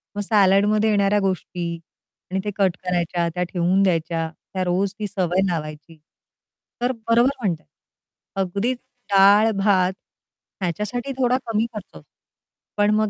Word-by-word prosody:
मग 205 - -2
सॅलाडमध्ये 205 +1 +3
येणाऱ्या 205 0 +3
गोष्टी 185 -2 -2 0.6
आणि 190 - 0
ते 205 - -1
कट 190 -4 +2
करायच्या, 175 -1 0
त्या 180 - 0
ठेवून 180 +2 +2
द्यायच्या, 165 -3 0 0.2
त्या 185 - -1
रोज 185 +2 0
ती 210 - -2
सवय 185 -2 0
लावायची. 155 -1 -5 0.8
तर 245 +1 +2 0.2
बरोबर 235 +3 +4
म्हणताय, 175 -8 -2 0.8
अगदीच 200 +7 -1 0.3
डाळ 200 +3 +6
भात 190 -2 +3 0.7
ह्याच्यासाठी 210 - -3
थोडा 250 -1 +2
कमी 225 0 +1
खर्च 210 -3 -6
होतो. - - -13 0.7
पण 205 0 +3
मग 215 0 +2
195 Hz, 135 wpm, -22 LUFS, 180-210 Hz, 0.8 s, डाळ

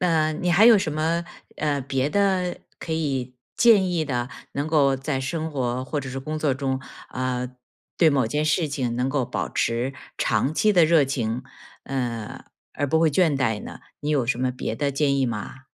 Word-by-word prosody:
啊 160 -3 +2
你 175 +3 -1
还 200 +6 +6
有 235 - +9
什 165 -6 -1
么， 165 +3 0 0.3
呃， 145 -2 0
别 135 +2 -1
的 190 -3 +1 0.2
可 160 - -4
以 135 -5 -2 0.2
建 215 -6 +5
议 170 -3 0
的， 125 -3 -2 0.2
能 140 +2 -2
够 140 -4 +3
在 135 0 -2
生 160 +4 -3
活 130 -3 -2
或 145 +2 -2
者 130 -1 -7
是 135 - -4
工 155 +3 -4
作 155 -3 +1
中， 130 0 -2 0.3
呃， 125 -1 -2 0.5
对 160 -3 +5
某 135 -4 +2
件 150 +7 -1
事 155 +1 +2
情 130 -5 -2
能 125 +2 0
够 135 -2 0
保 - - -3
持 120 +4 -1 0.2
长 140 - +1
期 210 +6 +3
的 175 -4 +6
热 155 -3 +5
情， 125 -2 -2 0.4
呃， 120 -5 -4 0.3
而 145 - -1
不 160 +3 +3
会 165 -1 +4
倦 160 -4 +3
怠 110 -5 0
呢？ - - -8 0.2
你 150 +1 -2
有 135 -5 +1
什 125 0 0
么 130 0 +1
别 125 -3 -4
的 140 +3 -1
建 140 0 +1
议 135 - +2
吗？ 120 +3 -5
140 Hz, 215 characters per minute, -24 LUFS, 130-160 Hz, 0.5 s, 有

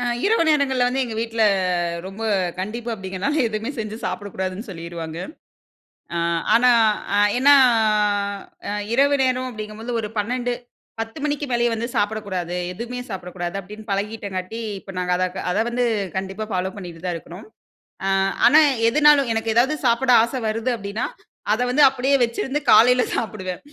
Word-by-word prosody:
அ - - -3 0.2
இரவு 445 -3 +3
நேரங்கள்ல 265 -4 +2
வந்து 265 +2 0
எங்க 230 -3 -6
வீட்ல 225 0 -1 0.6
ரொம்ப 195 +4 -8 0.4
கண்டிப்பு 230 +5 -5
அப்படிங்கனால, 195 +8 -3
எதுவுமே 220 +4 -3
செஞ்சு 215 0 -4
சாப்பிடக்கூடாதுன்னு 195 +2 -5
சொல்லிருவாங்க. 165 -2 -7 1.0
அ - - 0 0.4
ஆனா 250 +2 +5 0.5
அ - - +4 0.2
ஏன்னா, 285 +2 +7 1.1
அ - - -2 0.2
இரவு 280 +3 +4
நேரம் 255 0 0
அப்படிங்கும்போது 215 +1 -6
ஒரு 210 - -5
12. 245 +3 -1 0.5
10 225 +6 -6
மணிக்கு 290 -1 -1
மேலயே 240 0 +2
வந்து 230 +1 -2
சாப்பிடக்கூடாது, 200 -4 -2 0.2
எதுமே 240 +5 -6
சாப்பிடக்கூடாது. 180 -2 -5
அப்டின்னு 210 +3 -11
பழகிட்டங்காட்டி, 200 0 -3 0.2
இப்ப 195 - -11
நாங்க 180 0 0
அத 185 - +1 0.3
அத 180 - -1
வந்து 245 0 0 0.3
கண்டிப்பா 195 +3 -4
ஃபாலோ 185 0 -1
பண்ணிட்டு 175 -3 -9
தான் 175 -1 -1
இருக்கிறோம். 175 +5 -11 0.6
அ - - 0 0.4
ஆனா 305 - +7 0.3
எதுனாலும் 290 -1 +5
எனக்கு 225 0 -1
ஏதாவது 260 +6 +3
சாப்பிட 250 +2 +2
ஆசை 255 +3 -2
வருது 225 +3 -1
அப்டின்னா, 200 +1 -4 0.5
அத 225 - -1
வந்து 275 +4 +2
அப்படியே 270 +1 +1
வச்சிருந்து 265 +5 -1
காலைல 250 +4 +6
சாப்பிடுவேன். 190 -5 -4
225 Hz, 145 wpm, -22 LUFS, 195-250 Hz, 1.1 s, ஏன்னா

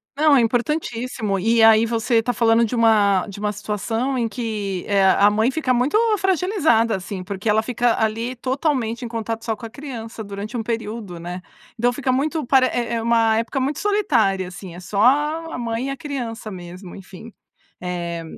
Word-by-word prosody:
Não, 300 0 +4
é 260 - +5
importantíssimo. 235 -3 -1
E 225 +4 +2
aí 225 0 +7
você 230 +1 -1
está 230 +2 +2
falando 230 0 +3
de 230 - -3
uma 210 -4 +3
de 200 -1 -9
uma 210 0 -1
situação 225 +5 -2
em 235 -2 0
que, 210 -5 -4
eh, 200 -1 +3
a 200 +2 +5
mãe 220 +4 +1
fica 290 -3 -1
muito 250 +8 +1 0.2
fragilizada, 350 - +2
assim, 190 0 -6
porque 200 +2 -6
ela 215 +1 +4
fica 240 0 0
ali, 225 +3 -1
totalmente 255 -2 -1
em - - -4
contato 225 0 -4
só 225 - -1
com 230 - -10
a - - -7
criança 230 -3 -8
durante 205 +4 -6
um 225 - -2
período, 220 -5 -4
né. 175 +2 -6 0.4
Então 245 +2 +2
fica 260 0 -1
muito 300 +4 0
pare 260 0 +5
é 235 -1 -2
é 230 - -1
uma 225 -1 +3
época 230 +4 -1
muito 270 +2 -1
solitária, 250 - +1
assim, 180 0 -9
é 175 - -9
só 200 +3 -2
a 300 +5 +2
a - - -4
mãe 235 +1 -3
e - - -3
a 275 - -5
criança 245 -6 -5
mesmo, 180 -1 -9
enfim. 195 +4 -11 0.5
Eh, 170 -2 -4
230 Hz, 195 wpm, -21 LUFS, 205-255 Hz, 0.5 s, aí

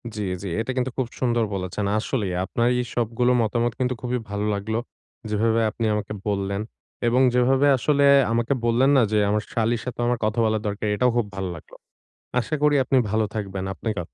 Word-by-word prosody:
জি, 105 - -3 0.2
জি। 100 - -4
এটা 115 +4 -2
কিন্তু 130 0 0
খুব 130 -3 0
সুন্দর 120 -2 +1
বলেছেন। 95 +2 -3
আসলেই 105 -6 -2
আপনার 115 +4 0
এই 125 - 0
সবগুলো 120 +1 +1
মতামত 120 +1 0
কিন্তু 130 0 +1
খুবই 125 +1 -1
ভালো 105 +1 -2
লাগলো। 105 +2 -2 0.5
যেভাবে 110 +2 +2
আপনি 115 0 -3
আমাকে 105 0 -3
বললেন 100 0 -1 0.5
এবং 125 +3 +3
যেভাবে 130 +3 +3
আসলে 140 +3 +2 0.3
আমাকে 120 +3 +1
বললেন 120 +3 +3
না - - +6
যে 110 - +2
আমার 105 +1 +1
শালীর 115 0 0
সাথেও 120 -1 -3
আমার 120 -1 0
কথা 110 +2 0
বলা 110 0 +2
দরকার 105 +1 -3
এটাও 125 +2 +2
খুব 120 - +2
ভাল্লাগলো। 90 -4 -6 0.6
আশা 115 +4 -2
করি 150 -1 +4
আপনি 130 - +1
ভালো 110 +1 +1
থাকবেন। 95 -2 -4
আপনাকে 105 -2 -4
115 Hz, 185 wpm, -24 LUFS, 105-125 Hz, 0.6 s, না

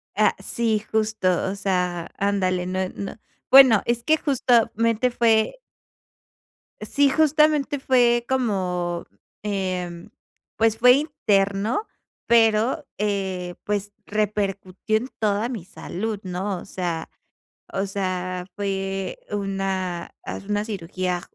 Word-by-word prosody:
Ah, - - +3
sí 225 -2 0
justo, 220 -3 0 0.2
o 200 - -3
sea, 180 -3 -1
ándale, 185 -3 0
no 185 0 -1
no 200 +2 -6 0.3
bueno, 255 -6 +8
es 235 0 0
que 315 0 +3
justamente 235 -4 +2
fue 230 - +2 1.2
Sí, 285 -1 +2
justamente 300 -1 +3
fue 240 -2 +3
como, 180 -9 -1 0.4
em, 185 -3 -3 0.5
pues, 225 0 +3
fue 250 +2 +7
interno, 220 - +1 0.4
pero, 225 +1 +3
eh, 190 -3 -2
pues, 205 0 -2
repercutió 205 -1 -1
en 245 +4 -4
toda 215 +2 +1
mi 215 -9 -5
salud 210 +3 -5
¿no? 185 +1 -3
O - - -10
sea 175 -4 -4 0.6
o 195 0 -1
sea, 185 -2 -3
fue 195 -1 -3
una, 195 -3 -2
hace - - -6
una 205 0 0
cirugía 185 -3 -3
205 Hz, 110 wpm, -23 LUFS, 185-230 Hz, 1.2 s, bueno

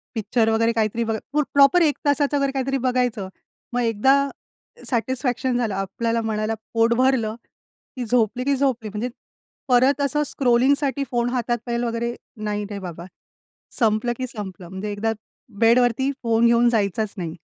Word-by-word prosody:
Picture 220 +1 +1
वगैरे 230 +1 +2
काहीतरी 225 +1 0
बघ 225 -1 -1 0.2
प्र 300 0 +3
प्रॉपर 280 +5 +6
1 300 -3 +2
तासाचं 285 0 +2
जर 275 -1 +1
काहीतरी 270 0 -1
बघायचं, 245 -6 -1 0.4
मग 245 - +1
एकदा 230 +3 +3 0.8
सॅटिस्फॅक्शन 250 0 -1
झालं, 225 -5 -1
आपल्याला 230 +4 -1
मनाला 215 0 -1 0.2
पोट 230 +1 +3
भरलं, 250 -4 +2 0.6
की 250 -2 -4
झोपली 245 +1 +1
की 280 0 +2
झोपली, 255 -5 0
म्हणजे 215 +4 -3 0.6
परत 260 +3 +4
असं 295 +2 +1
स्क्रॉलिंगसाठी 275 +2 +2
फोन 240 0 +1
हातात 240 -1 -1
पाहेल 235 0 -2
वगैरे 235 0 -2 0.3
नाही 210 0 -2
रे 200 - -4
बाबा. 175 -2 -8 0.7
संपलं 225 +1 +2
की 255 0 -3
संपलं, 190 -6 -8
म्हणजे 195 +2 -5
एकदा 220 +2 -1 0.5
बेडवरती 245 +3 +3
फोन 230 0 +3
घेऊन 235 0 +4
जायचाच 215 -1 0
नाही. 170 -3 -4
235 Hz, 150 wpm, -22 LUFS, 220-260 Hz, 0.8 s, प्रॉपर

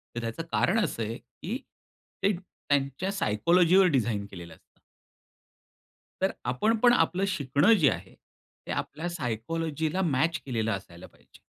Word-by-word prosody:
तर - - -2
त्याचं 115 +7 -4
कारण 215 +6 +2
असं 115 - -2
आहे, 115 +2 -4
की 170 - -7 0.7
ते 200 - +4
त्यांच्या 145 0 -2
सायकोलॉजीवर 175 - +4
डिझाइन 110 -5 0
केलेलं 85 -4 -10
असतं. - - -32 1.4
तर 190 - +2
आपण 130 - +1
पण 245 0 +6
आपलं 190 -4 +2
शिकणं 145 - +3
जे 160 -10 +5
आहे, - - -5
ते - - -15
आपल्या 160 +4 -3
सायकॉलॉजिला 160 - -2
मॅच 165 0 +1
केलेलं 115 -4 -1
असायला 90 -4 -7
पाहिजे. - - -22
145 Hz, 135 wpm, -28 LUFS, 115-185 Hz, 1.4 s, पण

